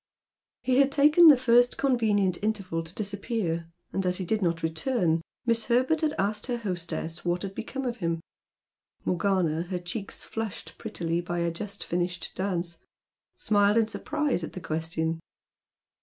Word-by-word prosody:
He 255 0 +3
had 275 0 +5
taken 300 +5 +7
the 295 -4 +9
first 245 0 +4
convenient 210 -8 +2
interval 200 -6 -1
to 165 +3 -10
disappear, 200 -5 -2 0.2
and 195 - 0
as 180 0 +1
he 185 - -3
did 215 +4 0
not 170 -2 0
return, 165 0 +1 0.2
Miss 230 -1 +2
Herbert 260 +7 +2
had 310 -1 +1
asked 210 +3 -1
her 245 -2 -1
hostess 175 -5 -4
what 175 +1 0
had 195 -1 -4
become 265 +6 -5
of 240 -1 -2
him? 165 -4 -1 0.9
Morgana, 180 -4 +1
her 185 - -1
cheeks 180 +4 -5
flushed 225 -3 -6
prettily 170 0 -2
by 175 0 -3
a 170 0 +1
just 200 +4 -6
finished 175 +1 -2
dance, 175 -3 -2 0.6
smiled 205 0 +3
in 225 -1 +4
surprise 295 - -1
at - - -6
the - - -5
question. 160 0 -2
195 Hz, 155 wpm, -28 LUFS, 170-235 Hz, 0.9 s, the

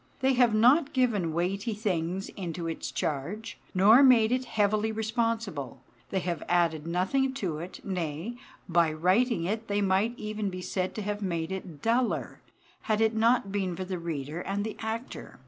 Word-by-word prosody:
They 265 0 +3
have 245 -3 +4
not 270 +7 +4
given 220 -10 +1
weighty 195 +7 -1
things 190 -2 -2
into 175 -3 -5
its 165 - -4
charge, 195 +10 -3 0.2
nor 210 +7 +7
made 240 -5 +6
it 255 +1 0
heavily 215 0 +1
responsible. 220 - -2 0.3
They 190 - -1
have 175 -2 -3
added 165 -3 +1
nothing 260 +11 +1
to 175 - -3
it; 175 +3 -9
nay, 180 +4 -3 0.3
by 170 -3 +3
writing 185 +5 +2
it 220 +5 -2
they 205 0 0
might 200 +4 +1
even 215 -1 -3
be 185 -1 -6
said 185 0 -2
to 215 - -3
have 205 +1 -3
made 170 -3 -2
it 185 -6 -7
duller, 235 +2 0 0.5
had 215 -1 +2
it 220 0 +3
not 225 -2 +2
been 190 -3 -1
for 185 +2 -4
the 185 -1 -4
reader 160 -1 -4
and 200 +2 -2
the 220 0 -4
actor. 225 - -6
200 Hz, 170 wpm, -28 LUFS, 175-225 Hz, 0.5 s, nor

